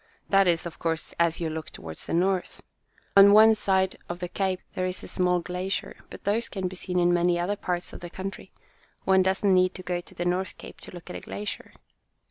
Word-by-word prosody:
That 195 -1 +5
is, 170 -1 +2
of 170 - -7
course, 165 -1 -2
as 170 -1 +2
you 170 - -1
look 160 -1 -5
toward 80 -1 -9
the - - -5
north. 185 +1 0 0.5
On 200 0 +9
one 220 +1 +8
side 190 -3 +1
of 175 - -3
the 180 0 -4
cape 190 0 -1
there 185 0 -1
is 185 0 -5
a - - -7
small 180 -1 +1
glacier, 180 +3 -3
but - - -11
those 220 +3 0
can 190 -2 -3
be 185 - -7
seen 180 0 -3
in 175 0 +4
many 175 0 +3
other 185 +4 0
parts 180 -3 -3
of - - -8
the 175 - -8
country. 190 +2 -7 0.5
One 190 0 +4
doesn't 190 +1 +2
need 185 0 +3
to 185 - -8
go 180 -1 -2
to 190 - -15
the 175 - -3
North 180 +1 -1
Cape - - -12
to - - -11
look 175 0 -10
at - - -5
a - - -9
glacier." 205 0 -6
185 Hz, 230 wpm, -26 LUFS, 175-190 Hz, 0.5 s, On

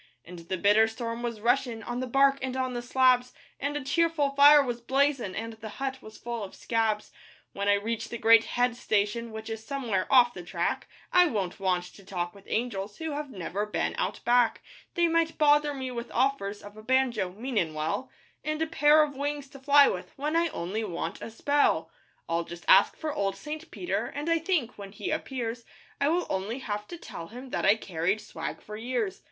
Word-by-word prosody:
And 175 0 -10
the 185 - -1
bitter 210 +4 +5
storm 230 +1 -5
was 235 -3 -4
rushin' 240 -1 +1
On 240 +2 -4
the 255 - -3
bark 275 +2 +4
and 260 -1 -3
on 255 -1 -1
the 240 - -3
slabs, 250 0 +3 0.3
And 285 +1 -2
a 290 - -5
cheerful 305 0 +1
fire 285 +1 +8
was 240 -2 -4
blazin', 265 -5 +1
And 225 +1 -4
the 220 0 -9
hut 265 -1 -3
was 215 0 -12
full 235 -2 -5
of 195 - -8
'scabs.' 220 -2 -1 0.4
When 200 0 -3
I 205 - +5
reach 220 +2 -3
the 235 - -4
great 225 0 +6
head 245 -1 +1
station 220 +1 -1
Which 220 0 -7
is 225 -1 -5
somewhere 230 -8 -2
'off 245 -2 +6
the 180 - -7
track' 175 - -2 0.3
I 360 0 +7
won't 200 - -2
want 185 -2 +1
to 200 - -15
talk 175 -2 -4
with 200 -1 -16
angels 210 -3 -2
Who 320 -1 -4
have 290 0 -4
never 200 0 -4
been 210 - -1
out - - -2
back; 240 -2 +3 0.3
They 345 0 +3
might 330 0 +1
bother 295 -1 +4
me 260 -2 -4
with 235 0 -5
offers 245 -6 0
Of 205 +1 -12
a - - -9
banjo 245 -4 +1
meanin' 210 -8 -2
well 155 +12 -2 0.3
And 310 0 -2
a 320 - +1
pair 305 -1 +5
of 290 -2 -4
wings 285 0 -3
to 275 -1 -12
fly 285 +1 +6
with, - - -4
When 300 +3 -2
I 335 0 +3
only 205 - -3
want 180 -5 -4
a - - -6
spell. 285 +6 +1 0.4
I'll 165 +1 0
just 170 +1 -10
ask 195 - +6
for 310 -2 -3
old 195 -4 -1
St. 305 +10 -7
Peter, 360 - -2
And 295 +3 -3
I 330 - +3
think, 315 - -1
when 200 -1 -8
he 210 - -4
appears, 245 -6 -3 0.4
I 280 - +2
will 350 +2 +1
only 195 +5 -2
have 210 -5 -4
to 345 - -8
tell 165 - -8
him 250 +5 -10
That - - 0
I 205 - +7
carried 185 -1 -1
swag 210 - -7
for 210 - -8
years. 225 -3 -2
240 Hz, 210 wpm, -28 LUFS, 210-280 Hz, 0.4 s, fire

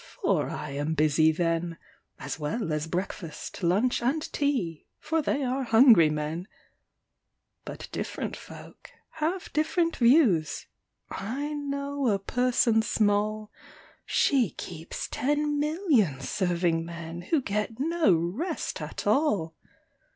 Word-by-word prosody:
For - - +2
I - - -5
am 145 +3 -2
busy 155 +1 +4
then, 165 0 -1 0.4
As - - -6
well 155 +3 -2
as 150 +1 -2
breakfast, 175 -1 -5
lunch, 200 +10 +2
and 275 +6 0
tea, 240 - -1
For 325 0 -1
they 285 -1 -1
are 260 +1 -1
hungry 225 - +6
men: 155 +4 -3 1.2
But - - -7
different - - -4
folk - - -12 0.3
have 335 +4 -2
different 330 +2 +1
views: 235 - +3 0.5
I 270 +10 -3
know 280 -1 -2
a 205 -3 +3
person 235 +1 +2
small 215 0 0 0.5
She 255 -8 +2
keeps 165 +2 -7
ten 295 +2 0
million 295 - +2
serving 170 +1 0
men, 170 0 -7
Who 320 - +3
get 210 -1 -3
no 330 - +2
rest 205 - -3
at - - -6
all! 205 - +2
215 Hz, 120 wpm, -27 LUFS, -, 1.2 s, hungry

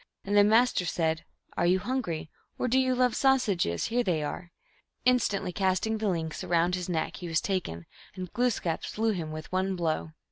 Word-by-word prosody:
And 200 +1 0
the 205 - +8
Master 225 -1 +4
said, 160 -2 -1
" - - -28
Are 175 - +2
you 180 +2 +4
hungry? 185 -8 -3 0.3
Or - - 0
do 255 +2 +3
you 260 -1 +2
love 250 -1 +2
sausages? 210 - +2
Here 240 +2 +1
they 165 -7 0
are! 170 +4 -5 0.3
" - - -43
Instantly 235 -7 +2
casting 195 +4 0
the 215 -1 0
links 160 -3 -3
around 175 +1 +2
his 180 0 -2
neck, 160 -3 -1
he 180 - -6
was 165 -1 +2
taken, 170 - -3 0.3
and 185 -2 -7
Glooskap 230 -9 0
slew 225 +1 0
him 165 -6 -3
with 155 0 -7
one 190 +1 0
blow. 160 -2 -2
185 Hz, 200 wpm, -28 LUFS, 165-225 Hz, 0.3 s, the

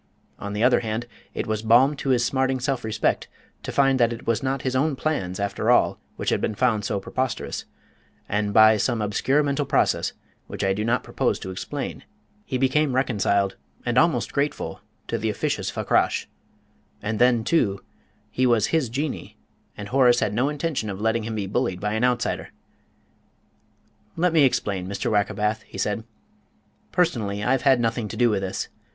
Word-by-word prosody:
On 100 0 -5
the 105 +2 -1
other 125 0 +5
hand, 115 +1 -3 0.3
it - - -2
was 110 -1 -2
balm 120 +6 +5
to 135 - -3
his 120 -2 +3
smarting 130 0 +1
self 135 0 -1
respect 110 -1 0 0.3
to - - -5
find 135 -1 +3
that 120 -1 +4
it 115 - -7
was 115 -2 +1
not 135 0 -2
his 130 -1 -1
own 140 +2 +1
plans, 100 -12 -2
after 100 0 -1
all, - - +4 0.2
which - - -2
had - - +1
been 110 - -1
found 110 -3 +1
so 100 0 -1
preposterous; 130 +5 -3 0.6
and, 105 0 0
by 110 +1 +7
some 120 +2 0
obscure 120 +8 +1
mental 145 0 0
process, - - +1 0.3
which - - -5
I 95 0 +2
do 105 +2 -2
not 120 +3 +1
propose - - 0
to 95 - -5
explain, 95 - -5 0.4
he 130 - -2
became 135 +1 +2
reconciled, 100 -6 +1 0.3
and 120 -1 0
almost 160 +5 +2
grateful, 145 +1 -2 0.3
to - - -2
the - - -1
officious - - -1
Fakrash. - - +1 0.8
And 110 0 -2
then, 120 -2 +4
too, 105 - +1 0.5
he 130 0 +2
was 115 -4 +3
his 155 -7 +2
Jinnee, 140 +5 -4 0.4
and 105 -1 -7
Horace 125 -2 +4
had 105 - 0
no 125 +6 +1
intention 150 -7 -2
of 95 -1 -5
letting 110 +1 0
him 110 -1 -4
be 105 -2 -2
bullied 95 -1 -1
by 105 +2 -2
an 110 +2 0
outsider. 125 -2 0 1.7
"Let 175 0 +1
me 155 -4 +6
explain, 100 -7 -1
Mr. 100 0 -2
Wackerbath," 105 +1 0
he - - -12
said. 105 +3 -1 0.9
"Personally 110 - 0
I've 130 +3 +2
had 135 -3 +4
nothing 115 -1 -1
to - - -7
do 120 -2 +4
with 100 -2 0
this. 95 -1 -3
115 Hz, 180 wpm, -24 LUFS, 105-130 Hz, 1.7 s, by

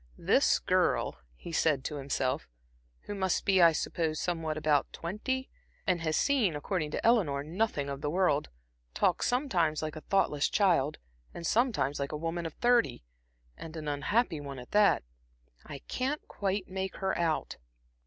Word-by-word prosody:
"This - - +3
girl," - - +1 0.2
he 170 - -9
said 155 -4 +2
to 150 - -4
himself 135 -2 -1 0.5
"who - - -6
must 190 -3 0
be, 190 -2 +4
I 170 -1 +8
suppose, 160 0 -1
somewhere 165 -3 -2
about 150 -2 +1
twenty, 260 +10 -3 0.3
and 180 -3 +1
has 155 -1 0
seen, 240 - +2
according 155 +1 -2
to - - -4
Eleanor, 175 -13 +3
nothing 165 -2 -1
of 140 0 -5
the 145 - -1
world, 170 -3 +1 0.5
talks - - +2
sometimes 180 - +1
like 155 0 -4
a 155 - -7
thoughtless 150 -7 +1
child, 170 -8 +2 0.4
and 170 - -6
sometimes 215 - +1
like 140 0 -2
a 150 - -3
woman 165 +2 -3
of 160 - -10
thirty, 240 - +2 0.5
and 160 - -9
an 155 -1 -6
unhappy 155 - 0
one 140 -1 -7
at 125 -1 -10
that. 205 - +4 0.6
I 145 -2 -8
can't 270 +4 -2
quite 195 -1 -2
make 190 0 -4
her 190 0 -1
out." 165 -2 -1
165 Hz, 165 wpm, -30 LUFS, 150-195 Hz, 0.6 s, I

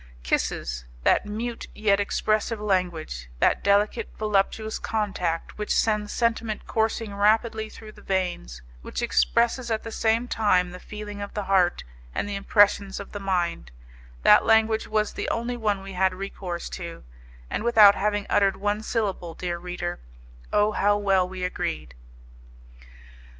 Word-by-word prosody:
Kisses - - -1 0.2
that - - +3
mute, 230 +3 -4
yet 200 -2 +2
expressive 215 +2 0
language, 175 - -2
that - - +2
delicate, 200 +1 +2
voluptuous 215 +1 0
contact 190 -6 -2
which 210 - -1
sends 210 -2 0
sentiment 230 -2 -1
coursing 220 -1 -1
rapidly 220 +2 +2
through 215 0 -11
the - - -16
veins, 175 - -3 0.2
which 240 - -5
expresses 235 +1 +2
at 220 -1 -1
the 225 - -6
same 225 +2 +1
time 185 -6 +2
the 180 - -9
feeling 210 0 -8
of 200 - -7
the 210 - -2
heart 185 -2 +2 0.3
and - - -1
the 205 - -4
impressions 200 0 +3
of 200 - -9
the 205 - -5
mind 185 -3 -1 0.5
that - - +7
language 220 0 +3
was 215 -1 0
the - - -3
only 235 +2 -2
one 210 -4 -1
we 195 0 -8
had 185 0 +1
recourse 185 -2 -5
to, 170 -2 -7 0.4
and - - -3
without 220 -4 +7
having 205 0 -1
uttered 195 -1 +3
one 205 +1 -1
syllable, 200 -7 -2
dear 175 -1 -3
reader, 175 0 -4 0.5
oh, 210 +1 +3
how 205 0 +2
well 195 -3 +2
we 185 -1 -6
agreed! 120 - -3
205 Hz, 150 wpm, -25 LUFS, 185-220 Hz, 0.5 s, that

